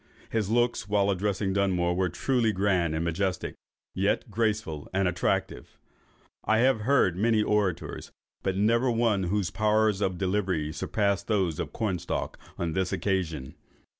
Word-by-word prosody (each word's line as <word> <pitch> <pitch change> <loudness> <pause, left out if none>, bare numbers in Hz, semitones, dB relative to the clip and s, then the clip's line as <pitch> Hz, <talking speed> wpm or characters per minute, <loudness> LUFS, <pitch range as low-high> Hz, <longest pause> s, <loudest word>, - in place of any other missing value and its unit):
His 110 -3 0
looks, 120 -3 +1
while 100 -1 +3
addressing 95 0 -1
Dunmore, 90 -3 +1
were 90 0 +1
truly 115 +5 +1
grand 95 -5 +1
and 80 +1 -1
majestic, 90 +2 -1 0.4
yet - - 0
graceful 105 -9 -1
and 95 0 +1
attractive. 90 0 -2 0.7
I 110 - +2
have 125 0 +3
heard 115 -7 +3
many 110 +3 +2
celebrated 105 0 +2 0.2
orators, - - -8 0.3
but 95 -1 -1
never 115 +5 +3
one 115 -5 +1
whose 95 0 -1
powers 110 -1 +2
of 95 -3 0
delivery 95 -5 -1
surpassed 100 0 -1
those 95 -7 0
of - - -3
Cornstalk 95 -6 -3 0.2
on 85 -2 -2
this 95 0 0
occasion." 80 -9 -2
100 Hz, 145 wpm, -27 LUFS, 90-110 Hz, 0.7 s, while